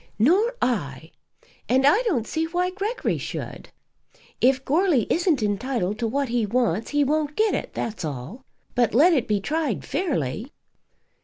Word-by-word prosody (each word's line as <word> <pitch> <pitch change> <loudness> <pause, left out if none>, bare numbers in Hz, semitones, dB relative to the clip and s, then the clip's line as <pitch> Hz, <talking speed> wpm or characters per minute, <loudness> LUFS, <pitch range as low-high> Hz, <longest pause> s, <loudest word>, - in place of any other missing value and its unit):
"Nor 380 - +3
I; 160 - -2 0.6
and 260 +2 +3
I 305 - +5
don't 330 - 0
see 320 +5 -1
why 355 +2 -1
Gregory 425 +6 -2
should. - - -6 0.7
If 265 +1 +3
Goarly 310 - +2
isn't 330 - +2
entitled 210 -1 -1
to 230 - 0
what 275 +3 -1
he 240 -1 +1
wants 225 -2 0
he 290 0 +2
won't 300 +1 0
get 435 0 +2
it; - - -4
that's 220 -4 -4
all. 150 - -6 0.3
But 240 -4 +1
let 335 +8 +6
it 265 -7 +1
be 210 -2 +1
tried 310 +9 -2
fairly." 240 - -2
265 Hz, 155 wpm, -24 LUFS, 215-325 Hz, 0.7 s, let